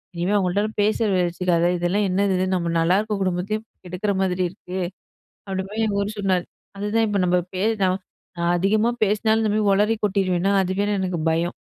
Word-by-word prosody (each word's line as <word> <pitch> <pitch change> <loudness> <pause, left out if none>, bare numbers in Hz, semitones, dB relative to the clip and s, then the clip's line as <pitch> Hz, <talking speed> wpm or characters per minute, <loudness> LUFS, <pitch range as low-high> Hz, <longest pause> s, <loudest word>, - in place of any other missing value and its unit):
இனிமே 175 +4 0
அவுங்கள்ட்ட 195 +1 +1 0.2
பேச்சு 205 -3 +2
வச்சிக்காத! 175 -1 +1
இதெல்லாம் 180 +4 +1
என்னது 195 +1 +1
இது? 185 - +1
நம்ம 170 -2 -1
நல்லாயிருக்கிற 200 +5 +1
குடும்பத்தையும் 190 +4 -1 0.2
கெடுக்கிற 180 +4 -2
மாதிரி 185 -1 0
இருக்கு. 185 0 -7 0.7
அப்பிடி 190 0 -2
போய் 220 +1 -1
இவரு 200 +1 -1
சொன்னாரு. 185 -3 +1 0.3
அதுதான் 210 +3 +1
இப்போ 205 -1 0
நம்ம 180 0 +3 0.2
பே 185 - -2 0.2
நான் 185 +1 +1 0.6
அதிகமா 210 +5 +2
பேசினாலும் 220 +2 +2
இந்தமாரி 215 0 +1
உளறி 210 +3 +2
கொட்டிருவேன்னா, 190 -2 +1
அதுவே 190 +2 -1
எனக்கு 185 -2 -2
பயம் 165 +2 0
195 Hz, 155 wpm, -23 LUFS, 180-210 Hz, 0.7 s, நம்ம